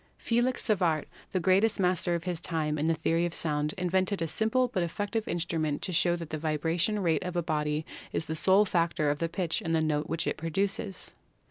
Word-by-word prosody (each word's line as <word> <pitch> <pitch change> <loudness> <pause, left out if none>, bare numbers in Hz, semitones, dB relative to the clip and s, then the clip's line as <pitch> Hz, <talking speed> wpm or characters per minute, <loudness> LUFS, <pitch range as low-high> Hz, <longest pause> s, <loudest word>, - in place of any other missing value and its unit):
Felix 240 +2 +1
Savart, 175 - +2 0.3
the 185 - 0
greatest 195 +5 +3
master 180 -2 +2
of 170 - -3
his 180 -2 -3
time 155 -3 -1
in 155 - 0
the 165 - +2
theory 165 +2 +1
of 170 - -4
sound, 150 -1 0
invented 185 +2 0
a - - -1
simple 220 +8 +2
but 195 -7 -2
effective 205 +6 -2
instrument 160 -3 -1
to - - -1
show 175 0 +3
that 165 -2 -7
the 155 - -3
vibration 165 +6 0
rate 165 -2 +2
of 180 -1 -5
a 175 - 0
body 150 0 -1 0.3
is 160 - -2
the 160 - -3
sole 190 +5 +5
factor 170 -5 +1
in 145 - -2
the 165 - -1
pitch 170 +3 -1
of 165 -5 -3
the 160 - +3
note 155 -1 0
which 165 0 -1
it - - -1
produces. 195 +5 -2
170 Hz, 215 wpm, -29 LUFS, 160-190 Hz, 0.3 s, sole